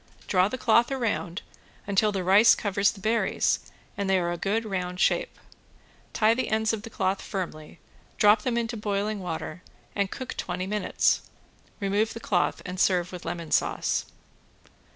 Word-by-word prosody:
Draw 185 Hz, -1 st, +3 dB
the 255 Hz, -, -4 dB
cloth 235 Hz, 0 st, +3 dB
around 220 Hz, -8 st, -2 dB, 0.4 s
until 200 Hz, +1 st, +2 dB
the 195 Hz, -2 st, -2 dB
rice 195 Hz, +5 st, +6 dB
covers 200 Hz, 0 st, +1 dB
the 205 Hz, -, -7 dB
berries 220 Hz, +4 st, +1 dB, 0.4 s
and 200 Hz, -1 st, -2 dB
they 190 Hz, -, +4 dB
are 175 Hz, -1 st, 0 dB
a -, -, -1 dB
good 205 Hz, +6 st, -1 dB
round 180 Hz, -3 st, -3 dB
shape. -, -, +1 dB, 0.7 s
Tie 220 Hz, +1 st, +3 dB
the 255 Hz, +2 st, -2 dB
ends 220 Hz, +1 st, +1 dB
of 220 Hz, -, -3 dB
the 225 Hz, -, -9 dB
cloth 190 Hz, -2 st, -1 dB
firmly, 170 Hz, -5 st, -6 dB, 0.4 s
drop 210 Hz, +1 st, +5 dB
them 240 Hz, +1 st, -1 dB
into 235 Hz, 0 st, -1 dB
boiling 210 Hz, 0 st, -2 dB
water 175 Hz, -1 st, -5 dB, 0.3 s
and 200 Hz, -1 st, 0 dB
cook 260 Hz, +4 st, -6 dB
twenty 180 Hz, +1 st, -3 dB
minutes. 210 Hz, +2 st, +1 dB, 0.6 s
Remove 205 Hz, +2 st, 0 dB
the -, -, -5 dB
cloth 185 Hz, -6 st, 0 dB
and 180 Hz, 0 st, -5 dB
serve 180 Hz, -2 st, +2 dB
with 180 Hz, -2 st, -8 dB
lemon 165 Hz, -1 st, -5 dB
sauce. -, -, +1 dB
200 Hz, 165 wpm, -26 LUFS, 180-220 Hz, 0.7 s, rice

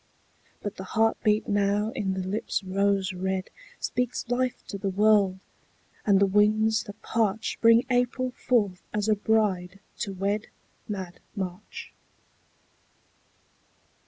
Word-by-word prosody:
But 205 Hz, 0 st, -4 dB
the 190 Hz, -, -5 dB
heartbeat 220 Hz, -1 st, +2 dB
now 205 Hz, +1 st, +1 dB
in 190 Hz, -4 st, -2 dB
the 185 Hz, -1 st, -3 dB
lips 205 Hz, +1 st, -2 dB
rose 195 Hz, 0 st, +1 dB
red 190 Hz, +1 st, -2 dB, 0.3 s
Speaks 250 Hz, 0 st, -2 dB
life 250 Hz, 0 st, 0 dB
to 200 Hz, -, -5 dB
the 195 Hz, -, -1 dB
world, 200 Hz, -1 st, +4 dB, 0.7 s
and 200 Hz, -2 st, +5 dB
the 200 Hz, -, +5 dB
winds 215 Hz, +3 st, +3 dB
that 205 Hz, 0 st, -10 dB
parch 220 Hz, -1 st, 0 dB
Bring 230 Hz, +2 st, +6 dB
April 250 Hz, 0 st, +1 dB
forth 210 Hz, -8 st, 0 dB
as 210 Hz, 0 st, 0 dB
a 215 Hz, -, +5 dB
bride 200 Hz, -3 st, 0 dB, 0.2 s
to 205 Hz, -, -2 dB
wed 200 Hz, +3 st, -1 dB, 0.4 s
Mad 190 Hz, -4 st, -5 dB, 0.2 s
March. 190 Hz, 0 st, -6 dB
205 Hz, 125 wpm, -27 LUFS, 190-220 Hz, 0.7 s, Bring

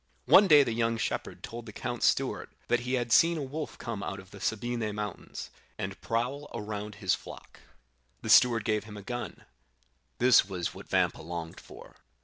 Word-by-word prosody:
"One 200 Hz, +1 st, +7 dB
day 150 Hz, -4 st, +8 dB
the 120 Hz, -4 st, -2 dB
young 115 Hz, 0 st, 0 dB
shepherd -, -, -3 dB
told 115 Hz, 0 st, -7 dB
the -, -, -7 dB
count's 120 Hz, +2 st, -1 dB
steward -, -, 0 dB, 0.2 s
that 120 Hz, -, +3 dB
he 125 Hz, +2 st, -1 dB
had 120 Hz, -2 st, -2 dB
seen 165 Hz, +7 st, +5 dB
a 150 Hz, -, -3 dB
wolf 150 Hz, +3 st, -5 dB
come 115 Hz, -4 st, -5 dB
out 95 Hz, -, -4 dB
of 95 Hz, 0 st, -14 dB
the 100 Hz, -, -11 dB
Sabine 110 Hz, -1 st, -2 dB
mountains, 105 Hz, -2 st, -6 dB, 0.3 s
and 95 Hz, +1 st, -5 dB
prowl 125 Hz, +6 st, -2 dB
around 105 Hz, 0 st, -5 dB
his 95 Hz, -3 st, +1 dB
flock. -, -, -8 dB, 0.6 s
The 110 Hz, -, -4 dB
steward 115 Hz, 0 st, +6 dB
gave 110 Hz, -2 st, 0 dB
him 105 Hz, -1 st, -10 dB
a 100 Hz, -, -9 dB
gun; 120 Hz, +2 st, -6 dB, 0.7 s
this 125 Hz, +1 st, +6 dB
was 90 Hz, -3 st, -4 dB
what -, -, -12 dB
Vampa -, -, +1 dB
longed 85 Hz, 0 st, -6 dB
for. -, -, -14 dB
115 Hz, 185 wpm, -29 LUFS, 105-125 Hz, 0.7 s, day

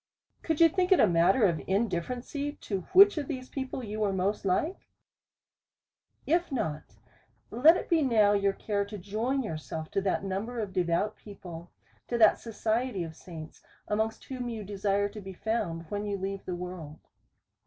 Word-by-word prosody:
Could 320 Hz, -2 st, -1 dB
you 335 Hz, -, +9 dB
think 365 Hz, +2 st, 0 dB
it 375 Hz, -, +7 dB
a -, -, +7 dB
matter 180 Hz, +5 st, +4 dB
of 170 Hz, -4 st, +1 dB
indifference 200 Hz, +4 st, -1 dB
to 285 Hz, -8 st, -3 dB
which 395 Hz, -2 st, +7 dB
of 285 Hz, -, -4 dB
these 255 Hz, -3 st, -5 dB
people 265 Hz, -1 st, -4 dB
you 215 Hz, -1 st, -5 dB
were 210 Hz, -2 st, +1 dB
most 195 Hz, +2 st, -1 dB
like? 300 Hz, -, 0 dB, 1.4 s
If 340 Hz, +2 st, +1 dB
not, 155 Hz, -, -3 dB, 0.6 s
let 300 Hz, +10 st, +6 dB
it -, -, -5 dB
be 335 Hz, -2 st, +3 dB
now 220 Hz, -7 st, +4 dB
your 200 Hz, -1 st, +2 dB
care 200 Hz, 0 st, -1 dB
to 205 Hz, +1 st, -8 dB
join 220 Hz, +8 st, -1 dB
yourself 155 Hz, -, -5 dB
to 195 Hz, -, 0 dB
that 190 Hz, 0 st, 0 dB
number 200 Hz, +5 st, -3 dB
of 205 Hz, -4 st, -4 dB
devout 180 Hz, +4 st, 0 dB
people, 175 Hz, -4 st, -10 dB, 0.4 s
to 240 Hz, -, -1 dB
that 220 Hz, -2 st, +6 dB
society 225 Hz, -2 st, -1 dB
of 160 Hz, -1 st, -8 dB
saints, 160 Hz, -3 st, -10 dB, 0.3 s
amongst 220 Hz, +1 st, -1 dB
whom 250 Hz, -2 st, -4 dB
you 225 Hz, -2 st, -5 dB
desire 200 Hz, 0 st, 0 dB
to 210 Hz, +1 st, -9 dB
be 190 Hz, 0 st, -8 dB
found, 185 Hz, -5 st, -2 dB
when 205 Hz, 0 st, -2 dB
you 200 Hz, -1 st, -1 dB
leave 195 Hz, +1 st, -4 dB
the 180 Hz, -, -3 dB
world. 175 Hz, -4 st, -7 dB
205 Hz, 175 wpm, -29 LUFS, 185-245 Hz, 1.4 s, you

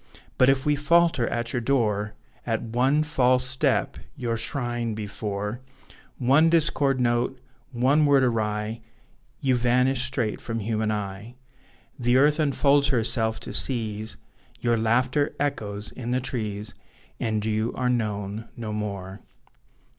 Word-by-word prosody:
But 130 Hz, -, +6 dB
if 135 Hz, +1 st, +2 dB
we 150 Hz, 0 st, +3 dB
falter 165 Hz, -2 st, +3 dB
at 120 Hz, 0 st, -2 dB
your 120 Hz, -, 0 dB
door 110 Hz, -5 st, 0 dB, 0.3 s
At 115 Hz, -2 st, -2 dB
one 130 Hz, +6 st, +2 dB
false 130 Hz, -4 st, +2 dB
step 130 Hz, 0 st, 0 dB, 0.2 s
your 120 Hz, -3 st, -2 dB
shrine, 120 Hz, -1 st, -1 dB
before 105 Hz, +1 st, -4 dB, 0.6 s
One 140 Hz, +6 st, +4 dB
discord 150 Hz, -5 st, +2 dB
note, 120 Hz, +1 st, +1 dB, 0.3 s
one 135 Hz, +5 st, +3 dB
word 140 Hz, -2 st, +5 dB
awry 110 Hz, -2 st, -1 dB, 0.6 s
You 130 Hz, -2 st, +2 dB
vanish 125 Hz, +2 st, +2 dB
straight 125 Hz, -5 st, -2 dB
from 115 Hz, -1 st, -4 dB
human 110 Hz, 0 st, -1 dB
eye: 105 Hz, +2 st, -5 dB, 0.6 s
The 120 Hz, +1 st, +3 dB
earth 150 Hz, +3 st, +4 dB
unfolds 140 Hz, -1 st, +3 dB
herself 115 Hz, -3 st, 0 dB
to -, -, -5 dB
seize, 110 Hz, -4 st, -2 dB, 0.4 s
Your 120 Hz, -1 st, +2 dB
laughter 125 Hz, +6 st, +1 dB
echoes 105 Hz, -8 st, -3 dB
in 120 Hz, -2 st, -6 dB
the 125 Hz, +1 st, +1 dB
trees; 110 Hz, -4 st, -4 dB, 0.5 s
And 110 Hz, -2 st, -1 dB
you 110 Hz, +1 st, 0 dB
are 125 Hz, -, -1 dB
known 105 Hz, -3 st, -2 dB
no 110 Hz, -2 st, -4 dB
more. 100 Hz, -2 st, -5 dB
120 Hz, 130 wpm, -25 LUFS, 110-135 Hz, 0.6 s, But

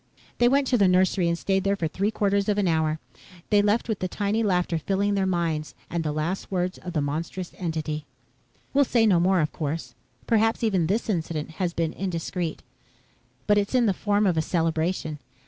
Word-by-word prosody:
They 240 Hz, -, +5 dB
went 275 Hz, +1 st, +3 dB
to 250 Hz, -2 st, +2 dB
the 200 Hz, -, +5 dB
nursery 185 Hz, 0 st, +3 dB
and 170 Hz, 0 st, +1 dB
stayed 190 Hz, +1 st, 0 dB
there 200 Hz, 0 st, +2 dB
for 170 Hz, -5 st, -1 dB
three 195 Hz, +6 st, -1 dB
quarters 200 Hz, -1 st, +1 dB
of 205 Hz, -, +1 dB
an 200 Hz, -2 st, +2 dB
hour. 160 Hz, -2 st, +1 dB, 0.5 s
They 205 Hz, -1 st, +6 dB
left 210 Hz, +3 st, +1 dB
with 220 Hz, -4 st, -2 dB
the 185 Hz, -, -1 dB
tinny 205 Hz, +4 st, -1 dB
laughter 180 Hz, -5 st, +1 dB
filling 200 Hz, +5 st, 0 dB
their 195 Hz, -1 st, +1 dB
minds 165 Hz, -4 st, -1 dB, 0.2 s
and 170 Hz, -1 st, -1 dB
the 155 Hz, -, -1 dB
last 155 Hz, +5 st, -2 dB
words 185 Hz, -1 st, -2 dB
of 180 Hz, -, -7 dB
the 155 Hz, -, +1 dB
monstrous 165 Hz, +5 st, -4 dB
entity. 155 Hz, -3 st, -3 dB, 0.7 s
"We'll 285 Hz, +1 st, +5 dB
say 235 Hz, -4 st, +2 dB
no 190 Hz, -5 st, +4 dB
more, 185 Hz, +1 st, +3 dB
of 150 Hz, -, -1 dB
course. 155 Hz, +1 st, -4 dB, 0.3 s
Perhaps 225 Hz, 0 st, +2 dB
even 190 Hz, -7 st, +2 dB
this 210 Hz, +6 st, 0 dB
incident 160 Hz, -6 st, -2 dB
has 175 Hz, -2 st, -1 dB
been 165 Hz, -1 st, -1 dB
indiscreet. 175 Hz, -2 st, -3 dB, 0.8 s
But 205 Hz, 0 st, +4 dB
it's 205 Hz, +5 st, -2 dB
in 245 Hz, -2 st, +4 dB
the 200 Hz, -, +3 dB
form 205 Hz, +2 st, +1 dB
of 180 Hz, -4 st, +2 dB
a -, -, +4 dB
celebration. 160 Hz, -1 st, -1 dB
185 Hz, 200 wpm, -25 LUFS, 165-205 Hz, 0.8 s, They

